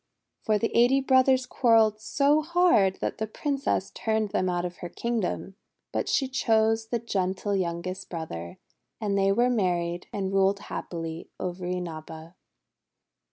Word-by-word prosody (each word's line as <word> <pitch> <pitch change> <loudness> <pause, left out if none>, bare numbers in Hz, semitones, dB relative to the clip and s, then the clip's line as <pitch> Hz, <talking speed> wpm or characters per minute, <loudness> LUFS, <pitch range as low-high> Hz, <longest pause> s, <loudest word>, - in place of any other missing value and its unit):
For 215 -1 +2
the 225 +2 -2
eighty 245 +3 +5
brothers 260 -1 +4
quar 240 -2 +3
relled 215 -1 +4
so 285 +6 +2
hard 335 - +3
that - - -3
the 220 - -1
Princess 275 -4 -2
turned 220 -2 -1
them 185 -1 0
out 175 0 -1
of 180 0 -6
her 175 - -7
kingdom. 210 -2 -3 0.3
But - - -2
she 270 - +2
chose 225 -3 +2
the 235 - -1
gentle 200 -2 -1
youngest 185 +1 -3
brother; 85 - -6 0.4
and 205 -2 -1
they 195 0 +3
were 240 +5 +3
married 175 -5 -1
and 195 -1 -3
ruled 195 +1 +3
happily 165 -4 -6
over 180 0 -4
Inaba. 165 -2 -6
200 Hz, 150 wpm, -27 LUFS, 180-235 Hz, 0.4 s, eighty